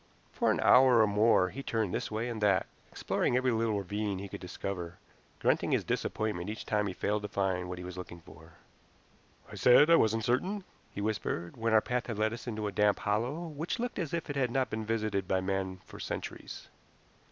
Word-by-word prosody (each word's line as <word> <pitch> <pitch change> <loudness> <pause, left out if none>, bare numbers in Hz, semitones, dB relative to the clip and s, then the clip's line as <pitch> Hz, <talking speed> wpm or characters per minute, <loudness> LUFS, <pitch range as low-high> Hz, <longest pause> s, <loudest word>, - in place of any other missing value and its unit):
For - - +1
an - - +2
hour 125 -2 +6
or - - +6
more 105 -2 +3
he 135 - -6
turned 110 -7 -1
this - - -2
way 110 +2 -2
and 115 -3 -4
that, 95 -4 +3 0.3
exploring 125 - 0
every 130 0 +2
little 110 -2 +1
ravine 100 +1 -2
he 100 +2 -6
could - - -8
discover, 90 -1 -5 0.4
grunting - - +1
his - - +2
disappointment 105 -4 -2
each 110 - -6
time 105 -1 0
he 95 - -3
failed 105 +1 -1
to 105 - -4
find 95 -3 -1
what 90 - -5
he 90 - -7
was 90 0 -7
looking 85 -1 -8
for. 80 0 -16 1.0
"I - - -10
said 145 +6 +6
I - - +9
wasn't 110 0 +2
certain," 185 - 0 0.3
he 100 - -6
whispered 100 -5 -2
when 115 0 -1
our 110 - +6
path 125 +2 -2
had 115 -4 -4
led 110 +1 +1
us 120 - -8
into 110 -2 -3
a 105 - -1
damp 105 0 +3
hollow 115 +10 -1
which 160 - -4
looked 245 -2 -3
as 165 -6 -2
if 170 -2 -3
it 145 - -4
had 130 -3 +1
not 130 +1 0
been 110 0 -3
visited 110 -4 -1
by 95 - +2
man 95 -1 -2
for - - -12
centuries. - - -6
105 Hz, 215 wpm, -31 LUFS, 95-120 Hz, 1.0 s, I